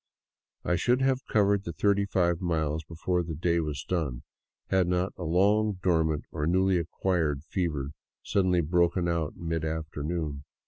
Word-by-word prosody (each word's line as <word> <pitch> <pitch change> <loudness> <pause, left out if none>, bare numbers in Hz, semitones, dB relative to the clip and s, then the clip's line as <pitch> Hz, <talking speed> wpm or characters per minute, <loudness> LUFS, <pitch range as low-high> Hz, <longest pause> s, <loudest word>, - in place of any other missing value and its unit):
I 90 - +2
should 125 +6 +2
have 135 0 +1
covered 100 -2 +3
the 85 - -5
thirty 100 +2 +2
five 85 -3 +1
miles 80 -3 -1
before 90 +2 -1
the 80 -2 -5
day 85 +2 +1
was 75 -3 -3
done, 75 -10 -2 0.5
had 95 -2 +3
not 90 +1 0
a 90 - -6
long 100 +6 +3
dormant 80 -5 +1
or 75 -1 -2
newly 95 +1 +3
acquired 80 -4 -1
fever 75 -6 -2 0.3
suddenly 90 -3 +2
broken 85 +2 +2
out 85 -3 -1
in 85 - -7
mid 80 -1 -1
afternoon. 80 -1 -3
85 Hz, 155 wpm, -28 LUFS, 80-95 Hz, 0.5 s, covered